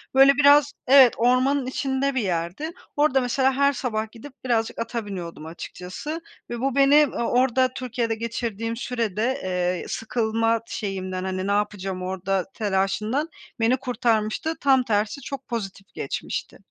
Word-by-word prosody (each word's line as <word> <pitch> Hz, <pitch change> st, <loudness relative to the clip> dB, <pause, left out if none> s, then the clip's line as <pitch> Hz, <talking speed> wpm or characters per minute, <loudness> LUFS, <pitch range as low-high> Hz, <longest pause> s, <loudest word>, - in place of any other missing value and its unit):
Böyle, 270 Hz, +1 st, +8 dB
biraz 285 Hz, 0 st, +6 dB
Evet, 265 Hz, -2 st, +8 dB
ormanın 255 Hz, +3 st, +3 dB
içinde 265 Hz, +1 st, -1 dB
bir 255 Hz, -, +1 dB
yerdi. 180 Hz, -, -2 dB, 0.3 s
Orada 290 Hz, -3 st, +3 dB
mesela 265 Hz, +2 st, +2 dB
her 280 Hz, +1 st, +3 dB
sabah 220 Hz, -4 st, -3 dB
gidip 255 Hz, +4 st, -12 dB
birazcık 230 Hz, -2 st, 0 dB
ata 230 Hz, -1 st, -3 dB
biniyordum 170 Hz, -5 st, -7 dB
açıkçası 185 Hz, -, -7 dB, 0.3 s
ve 240 Hz, -1 st, -4 dB
bu 265 Hz, 0 st, -1 dB
beni, 280 Hz, +2 st, +6 dB
ııı, 255 Hz, -4 st, -2 dB
orada 255 Hz, +1 st, +2 dB
Türkiye'de 245 Hz, -3 st, -2 dB
geçirdiğim 230 Hz, 0 st, -3 dB
sürede, 235 Hz, +2 st, -2 dB
eee, 180 Hz, -1 st, -1 dB
sıkılma 225 Hz, 0 st, 0 dB
şeyimden, 185 Hz, -3 st, -4 dB
hani, 190 Hz, 0 st, -3 dB
"Ne -, -, +1 dB
yapacağım 200 Hz, -2 st, -1 dB
orada?" 190 Hz, 0 st, -1 dB
telaşından 210 Hz, -, 0 dB, 0.3 s
beni 230 Hz, +3 st, +3 dB
kurtarmıştı, 245 Hz, +3 st, 0 dB
tam 265 Hz, -2 st, +4 dB
tersi 215 Hz, +3 st, -1 dB
çok 275 Hz, -1 st, -7 dB
pozitif 195 Hz, -5 st, -6 dB
geçmişti. 135 Hz, -, -4 dB
230 Hz, 140 wpm, -24 LUFS, 200-265 Hz, 0.3 s, Böyle